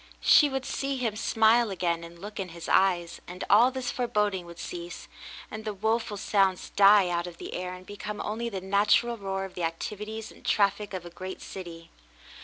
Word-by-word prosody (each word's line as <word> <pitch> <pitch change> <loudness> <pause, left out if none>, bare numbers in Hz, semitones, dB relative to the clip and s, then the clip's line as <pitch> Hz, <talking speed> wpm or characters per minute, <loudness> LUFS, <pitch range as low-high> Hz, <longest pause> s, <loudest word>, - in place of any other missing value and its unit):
She 295 - +6
would 270 -1 -3
see 275 0 -2
him 230 -4 -1
smile 225 +1 +3
again 170 -3 -1
and 170 0 -11
look 205 +4 -8
in 190 -2 -3
his 170 0 -9
eyes, 175 -3 +2
and 180 +1 -7
all 230 +5 +7
this 260 -1 -3
foreboding 210 -7 -1
would 170 0 -11
cease, 175 0 -7 0.4
and 220 0 -6
the 215 -1 -4
woful 220 +1 -1
sounds 195 -2 +1
die 200 -1 +6
out 175 0 -1
of 175 -1 -10
the - - -7
air 180 0 -4
and 185 0 -13
become 205 +1 -6
only 230 +3 -3
the 195 -4 -5
natural 205 +5 +3
roar 195 -2 -3
of 190 - -10
the 180 - -6
activities 210 +6 -4
and - - -17
traflfic 200 0 +1
of 180 -2 -6
a 175 - -9
great 185 +2 -7
city. 170 -3 -9
200 Hz, 200 wpm, -28 LUFS, 180-220 Hz, 0.4 s, all